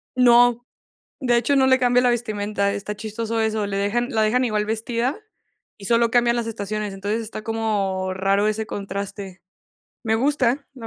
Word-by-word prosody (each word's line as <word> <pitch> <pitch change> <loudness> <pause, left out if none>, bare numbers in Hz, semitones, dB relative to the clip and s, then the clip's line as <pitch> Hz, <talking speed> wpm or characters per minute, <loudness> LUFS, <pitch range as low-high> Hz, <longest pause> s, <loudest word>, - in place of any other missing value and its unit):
No. 245 -1 +5 0.6
De 245 -3 +2
hecho, 275 +4 +2
no 265 - +4
le 260 0 +4
cambia 245 0 +3
la 250 - +3
vestimenta. 210 -4 -1
Está 200 +1 -5
chistoso 225 +1 -3
eso. 220 -1 0
Le 200 -1 -3
dejan 210 +5 0
la 220 -3 +1
dejan 245 +4 +2
igual 210 -3 0
vestida 230 +4 -1 0.6
y 200 - -9
solo 235 +1 +3
cambian 240 0 +3
las 235 -1 -2
estaciones. 210 -1 -4
Entonces, 205 +4 -2
está 215 -1 -7
como 205 -4 -1
raro 195 +2 +1
ese 215 +1 -2
contraste. 195 -2 -6 0.6
Me 220 -1 +1
gusta, 270 +1 +1
la 240 -4 -9
220 Hz, 170 wpm, -22 LUFS, 205-240 Hz, 0.6 s, No